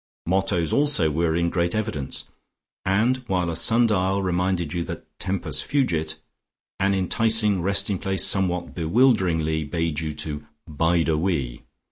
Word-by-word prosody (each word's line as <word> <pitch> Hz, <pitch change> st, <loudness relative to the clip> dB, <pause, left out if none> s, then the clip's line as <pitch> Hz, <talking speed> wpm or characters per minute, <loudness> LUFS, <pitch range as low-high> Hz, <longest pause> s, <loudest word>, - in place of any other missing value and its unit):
Mottos 95 Hz, -2 st, 0 dB
also 140 Hz, -, +3 dB
were 80 Hz, +1 st, 0 dB
in 85 Hz, 0 st, 0 dB
great 85 Hz, +1 st, 0 dB
evidence, 100 Hz, -11 st, -3 dB, 0.6 s
and 110 Hz, +7 st, +2 dB
while 90 Hz, -4 st, 0 dB
a -, -, -4 dB
sundial 100 Hz, -2 st, +3 dB
reminded 90 Hz, -3 st, -1 dB
you 85 Hz, -, -1 dB
that -, -, -7 dB
"Tempus 95 Hz, 0 st, -2 dB
fugit," 80 Hz, -, -1 dB, 0.6 s
an 100 Hz, +1 st, +2 dB
enticing 105 Hz, +1 st, +2 dB
resting 100 Hz, +1 st, +1 dB
place 95 Hz, -2 st, 0 dB
somewhat 90 Hz, -3 st, 0 dB
bewilderingly 85 Hz, -5 st, +2 dB
bade 80 Hz, 0 st, -2 dB
you 80 Hz, -2 st, -4 dB
to 75 Hz, -1 st, -5 dB, 0.2 s
"Bide 80 Hz, +2 st, +1 dB
a 80 Hz, -2 st, +1 dB
wee." 75 Hz, -9 st, -2 dB
90 Hz, 135 wpm, -23 LUFS, 80-100 Hz, 0.6 s, also